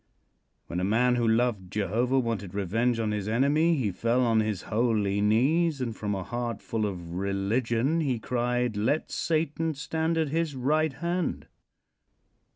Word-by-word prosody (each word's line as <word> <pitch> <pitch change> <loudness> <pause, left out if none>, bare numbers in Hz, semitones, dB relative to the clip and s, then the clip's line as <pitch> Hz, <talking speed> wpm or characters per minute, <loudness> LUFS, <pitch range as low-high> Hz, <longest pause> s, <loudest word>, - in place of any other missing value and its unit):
When 85 - -4
a - - -1
man 115 +6 +3
who 120 -1 +1
loved 110 -5 +1
Jehovah 115 +6 0
wanted 110 -7 -2
revenge 115 +5 0
on 110 -2 0
his 105 -1 -3
enemy 145 +9 +3
he 120 -9 0
fell 115 +6 +1
on 115 -1 +3
his 105 -3 -1
holy 105 -3 +1
knees, 140 +9 +2
and 120 -4 -3
from 105 -1 -2
a 95 - -4
heart 120 0 -3
full 110 -2 -2
of 90 -4 -6
religion 115 - 0
he 135 -6 0
cried: 125 0 -1
"Let 120 +9 0
Satan 160 0 -1
stand 160 +4 -1
at 160 -2 +1
his 160 -1 -1
right 150 +4 +1
hand." 170 +3 -2
120 Hz, 160 wpm, -27 LUFS, 105-140 Hz, -, man